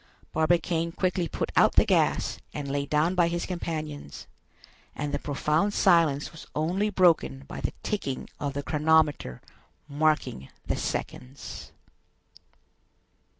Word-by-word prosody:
Barbicane 165 +1 +1
quickly 185 -1 0
put - - -3
out - - +5
the - - +6
gas - - +1 0.2
and 145 -1 -4
lay 140 0 -1
down 155 +5 +2
by 175 -2 +3
his 170 0 -2
companions, 155 - -5 0.7
and 145 0 -3
the 145 - 0
profound 150 +8 0
silence 165 -7 +3
was 160 - -12
only 180 +7 +1
broken 165 - +2
by - - -7
the - - -2
ticking 140 -11 -3
of 140 -1 -2
the 140 - -2
chronometer 150 - +2 0.5
marking 150 - 0 0.2
the - - 0
seconds. 130 +3 -5
155 Hz, 125 wpm, -27 LUFS, 145-170 Hz, 0.7 s, the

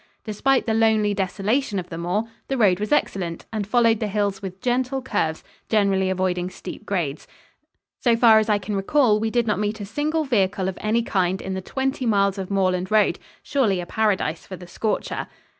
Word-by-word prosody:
Despite 250 +5 +1
the 225 - 0
lonely 220 -2 +3
desolation 205 +4 -1
of 180 -2 -4
the 165 - -6
moor, 180 +5 0 0.2
the 270 - -1
road 200 -6 +4
was 210 +4 -3
excellent, 180 - 0
and 210 -3 -2
followed 230 -1 +3
the 215 - -1
hills 200 -1 -1
with 190 -1 -7
gentle 255 +3 0
curves, 205 -11 -2 0.3
generally 195 -3 +2
avoiding 185 -1 -1
steep - - -9
grades. 165 -8 -2 0.7
So 235 -2 +3
far 225 -2 +6
as 220 - -1
I 210 - +4
can 205 +1 -4
recall, 215 +2 +3
we 220 +1 0
did 240 +1 +1
not 210 -3 0
meet 210 +1 -2
a 205 - -5
single 300 +9 -1
vehicle 195 -6 +1
of 190 - -4
any 225 +2 +1
kind 190 -3 0
in 190 - -5
the 190 - -3
twenty 265 +4 -2
miles 200 -2 +2
of 190 - -5
moorland 185 -2 0
road 215 -1 +3 0.2
surely 220 -10 +1
a 175 - -4
paradise 200 -6 0
for 190 - -8
the 180 - -11
scorcher. 210 +5 -3
205 Hz, 195 wpm, -23 LUFS, 190-225 Hz, 0.7 s, far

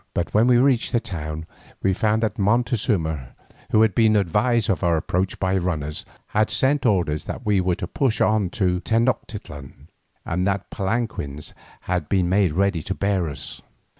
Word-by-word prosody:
But 85 - -2
when 110 +3 +4
we 125 -1 +5
reached 125 -1 +2
the 120 - +4
town 80 -5 -6 0.4
we 95 - +3
found 110 +3 +1
that 110 +1 -1
Montezuma, 100 - 0 0.3
who 110 - +4
had 110 -3 +2
been 110 +2 +4
advised 105 +4 +2
of 95 -2 0
our 85 -2 +3
approach 90 +4 -2
by 95 0 +1
runners, 75 -4 -3 0.2
had 110 +1 +1
sent 135 0 +2
orders 85 -8 +1
that - - -6
we 105 -3 +3
were 90 -1 +1
to - - -5
push 125 +5 0
on 110 -4 +2
to 90 -3 0
Tenoctitlan, 105 - -3 0.4
and 90 +2 -1
that 100 -1 -2
palanquins 95 - -3 0.3
had 90 -5 -2
been 95 -3 +2
made 95 -4 +2
ready 95 -1 +1
to 95 +5 -4
bear 95 -4 0
us. 70 - -8
95 Hz, 170 wpm, -23 LUFS, 85-110 Hz, 0.4 s, we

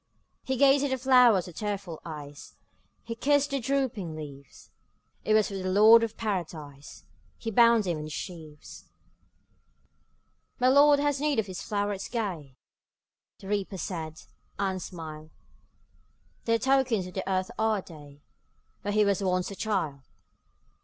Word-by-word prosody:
'' - - -47
He 265 - +1
gazed 275 +1 +5
at 285 - 0
the 265 - 0
flowers 250 -7 +5
with 180 - -12
tearful 200 -6 -4
eyes, 145 -3 -9 0.5
He 230 - -5
kissed 285 +4 +1
their 275 - 0
drooping 230 - -2
leaves; 140 -3 -11 0.5
It 215 - +2
was 215 -1 +3
for - - -8
the 185 -1 -3
Lord 215 +4 +7
of 225 -1 -3
Paradise 160 -9 -5 0.3
He 225 - -5
bound 230 0 +5
them 175 -5 -2
in 150 - -6
his 155 - -8
sheaves. 155 -3 -9 1.7
``My 255 +1 +4
Lord 290 +1 +6
has 285 -1 0
need 300 -2 +1
of 220 - +1
these 190 0 -7
flowerets 205 -1 -3
gay,'' 180 - -4 0.9
The 195 - -10
Reaper 200 -1 -2
said, 160 -3 -6 0.3
and 190 -2 -1
smiled; 155 -3 -8 1.2
``Dear 230 0 +3
tokens 260 -6 +2
of 180 - -10
the 190 +1 -4
earth 185 +3 -1
are 220 -3 +1
they, 145 -3 -14 0.6
Where 205 - -3
he 210 0 +4
was 200 0 +1
once 185 0 0
a - - -7
child. 185 -10 -2
200 Hz, 155 wpm, -28 LUFS, 165-230 Hz, 1.7 s, Lord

